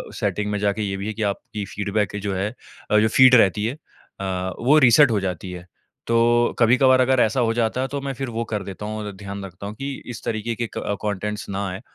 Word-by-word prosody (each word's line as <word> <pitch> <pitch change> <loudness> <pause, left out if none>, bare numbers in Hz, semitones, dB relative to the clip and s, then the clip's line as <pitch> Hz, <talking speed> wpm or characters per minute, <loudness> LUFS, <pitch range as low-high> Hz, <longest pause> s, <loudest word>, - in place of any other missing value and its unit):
Setting 105 0 -1
में 105 - -1
जाके 105 +1 0
ये 100 -1 -2
भी 100 +2 -5
है 110 - -3
कि 110 - -7
आपकी 100 +1 -3
फीडबैक 100 +2 -2
जो 100 -1 -2
है 95 +3 -1 0.4
अ, 105 - +5
जो 110 - +3
फीड 130 +3 +7
रहती 105 -2 +4
है 115 - -1
अ, 95 -10 -6
वो 140 +6 +4
रीसेट 130 0 +6
हो 105 - +2
जाती 95 0 -4
है, 90 0 -8 0.4
तो 120 +1 +3
कभी-कभार 130 +2 +5
अगर 130 0 +3
ऐसा 110 +4 0
हो 115 -1 +1
जाता 120 +2 0
है 135 - -1
तो 140 0 -3
मैं 135 0 -3
फिर 135 +1 -4
वो 115 0 -3
कर 105 -2 -1
देता 100 +2 -7
हूँ 110 +1 -4
और 105 - -5
ध्यान 100 0 -7
रखता 95 +1 -9
हूँ 105 - -7
कि 140 +4 -4 0.2
इस 115 - -9
तरीके 115 +1 -2
के 120 0 -3
क 100 - -2
कॉन्टेंट्स 105 0 -3
ना 100 +1 -2
आए। 95 +3 -6
105 Hz, 240 wpm, -22 LUFS, 100-120 Hz, 0.4 s, फीड